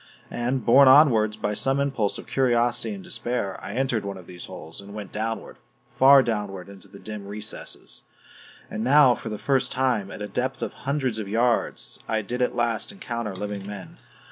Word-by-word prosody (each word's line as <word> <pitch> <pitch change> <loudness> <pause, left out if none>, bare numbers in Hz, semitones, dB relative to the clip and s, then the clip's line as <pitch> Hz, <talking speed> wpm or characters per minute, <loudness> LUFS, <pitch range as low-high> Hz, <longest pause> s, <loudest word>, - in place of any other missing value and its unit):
And, 125 +2 -1
borne 135 +3 +7
onward 115 -7 +6
by 105 - +1
some 135 +6 +1
impulse 135 -7 0
of - - -9
curiosity 120 - +1
and 195 - -10
despair, 120 - -3
I - - -6
entered 125 -4 0
one 100 -1 -5
of 90 - -12
these 90 0 -8
holes, 80 +5 -9
and 100 +1 -11
went 105 -2 -7
downward, 115 +1 -4 0.4
far 135 0 +8
downward 100 -5 -3
into 100 -2 -11
the - - -13
dim 105 -1 -7
recesses. 105 +2 -5 0.7
And 110 - -4
now 135 0 +6
for 110 - -6
the 105 - -4
first 130 +1 +1
time, 125 -7 0
at - - -8
a - - -4
depth 130 +4 -2
of - - -4 0.2
hundreds 130 -6 0
of 105 - -4
yards, 115 +3 0
I 110 -1 0
did 125 +5 -4
at 125 - +1
last 115 -2 0
encounter 120 - -5
living 100 0 -5
men. 100 -2 -8
115 Hz, 190 wpm, -25 LUFS, 105-130 Hz, 0.7 s, far